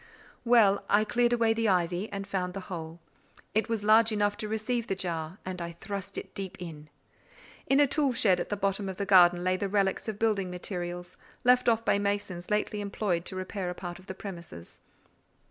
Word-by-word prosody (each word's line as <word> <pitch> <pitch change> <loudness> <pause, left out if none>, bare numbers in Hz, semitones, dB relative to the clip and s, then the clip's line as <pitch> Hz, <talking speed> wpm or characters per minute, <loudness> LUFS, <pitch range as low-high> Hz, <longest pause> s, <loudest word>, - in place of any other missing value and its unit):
Well, 230 -5 +4
I 205 +1 +4
cleared 240 +2 +2
away 230 -2 +3
the 225 -1 +1
ivy, 180 +2 0
and 200 -1 -4
found 185 -2 -3
the - - -3
hole; 165 -1 -6 0.5
it 220 +2 +1
was 225 -3 -1
large 220 +2 +5
enough 205 -1 +1
to 215 -1 -4
receive 220 +2 -2
the 195 - -1
jar, 170 -2 -3
and 185 -1 -5
I 170 0 -5
thrust 195 +2 -6
it - - -7
deep 195 -2 -6
in. 155 -4 -9 0.8
In 275 - +4
a 290 - +7
tool 280 0 +1
shed 205 -6 +3
at - - -3
the 205 - -2
bottom 195 0 -1
of 190 - -6
the 200 - -2
garden, 175 -2 +6
lay 185 0 +1
the 200 0 -2
relics 195 0 0
of 215 -2 -3
building 210 -4 +1
materials, 175 -1 -5 0.3
left 250 0 +5 0.2
by 200 - +3
masons 200 -3 -2
lately 210 0 0
employed 200 -4 -2
to 190 - -6
repair 185 0 -4
a 180 - -5
part 175 -1 -7
of 185 - -18
the 190 - -6
premises. 170 - -9
195 Hz, 200 wpm, -29 LUFS, 180-215 Hz, 0.8 s, a